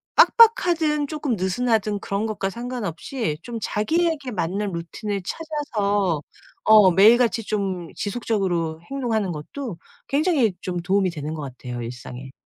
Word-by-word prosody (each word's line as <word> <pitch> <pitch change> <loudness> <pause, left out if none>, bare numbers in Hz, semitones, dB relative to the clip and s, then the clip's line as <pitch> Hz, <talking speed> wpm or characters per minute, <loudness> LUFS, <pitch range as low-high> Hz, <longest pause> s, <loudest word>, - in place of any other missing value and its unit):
빡빡하든 345 -11 +5
조금 290 -5 -2
느슨하든 210 +2 0
그런 200 +3 -2
것과 205 -3 -2
상관없이 235 - -4
좀 235 -1 -5
자기에게 305 +6 0
맞는 195 +1 -2
루틴을 195 +4 -4
찾아서 205 - -1 0.4
어 215 -3 +7
매일같이 225 +5 +5
좀 190 -5 -3
지속적으로 190 -7 -1
행동하는 230 -8 -1
것도 180 - -6 0.3
굉장히 285 - +2
좀 180 -1 -3
도움이 185 +1 +1
되는 150 -1 -5
것 155 - -6 0.2
같아요 125 -1 -6
일상에. 125 +2 -8
210 Hz, 310 characters per minute, -23 LUFS, 180-250 Hz, 0.4 s, 어